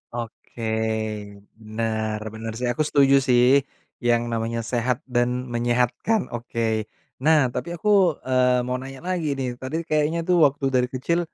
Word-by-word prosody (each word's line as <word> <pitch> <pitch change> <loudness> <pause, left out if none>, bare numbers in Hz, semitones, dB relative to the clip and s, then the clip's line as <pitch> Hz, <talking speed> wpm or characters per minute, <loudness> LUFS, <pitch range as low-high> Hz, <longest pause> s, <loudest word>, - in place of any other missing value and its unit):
Oke. 120 0 -8 1.0
Benar 110 0 -2
benar 110 0 -5
sih 125 +1 -2
aku 155 +5 0
setuju 140 -1 +4
sih, 120 -1 +5 0.6
yang 120 -1 +2
namanya 115 0 -2
sehat 120 +1 -1
dan 125 0 0
menyehatkan, 120 - 0
oke. 115 -2 -2 0.4
Nah 150 -5 +4
tapi 125 +6 -4
aku, 190 -3 +3
eee, 125 -1 +2
mau 125 +1 -2
nanya 135 +1 -9
lagi 180 -3 -2
nih, 125 -2 -4
tadi 155 +6 -3
kayaknya 155 +2 +1
tuh 180 +1 +2
waktu 140 0 -4
dari 125 0 +3
kecil, 135 +7 -1
125 Hz, 145 wpm, -23 LUFS, 120-145 Hz, 1.0 s, sih